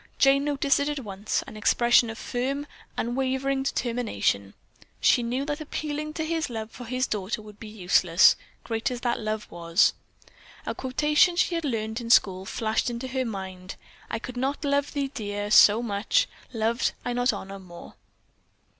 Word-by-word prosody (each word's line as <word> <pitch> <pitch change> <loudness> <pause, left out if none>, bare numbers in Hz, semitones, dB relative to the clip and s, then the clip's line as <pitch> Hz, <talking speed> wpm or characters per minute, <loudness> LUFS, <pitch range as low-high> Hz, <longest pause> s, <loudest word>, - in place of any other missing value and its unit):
Jane 275 +1 +4
noticed 280 -1 +2
it 285 +1 0
at 295 -2 -3
once; 205 0 -2
an - - -11
expression 235 +2 +4
of 225 - -6
firm, 270 +5 -2 0.3
unwavering 265 +3 0
determination. 230 - -1 0.4
She - - +4
knew 245 +4 -2
that 295 +1 -3
appealing 305 0 -4
to 315 0 -3
his 325 -2 -1
love 220 -2 -5
for 245 - -9
his 255 +2 0
daughter 210 +1 -3
would 210 -1 -13
be 225 - -8
useless, 180 -4 +4 0.3
great 225 -1 -1
as 245 -1 -5
that 240 -1 0
love 215 -1 -3
was. 170 +3 +3 0.7
A - - -2
quotation 300 +6 +2
she 350 - +2
had 335 -2 -1
learned 220 -2 -2
in 230 - -6
school 190 -5 +4
flashed 220 +1 -1
into 240 +2 -5
her 260 0 -1
mind 190 -4 -6 0.3
"I - - -2
could 245 +2 -8
not 275 +4 -1
love 280 0 +1
thee, 280 -2 -2
dear, 205 -3 -4
so 215 +2 +7
much, 230 - +1 0.2
loved 230 +1 0
I 245 - -1
not 245 +1 +2
honor 195 -1 -7
more." 175 -2 -12
240 Hz, 170 wpm, -26 LUFS, 210-275 Hz, 0.7 s, so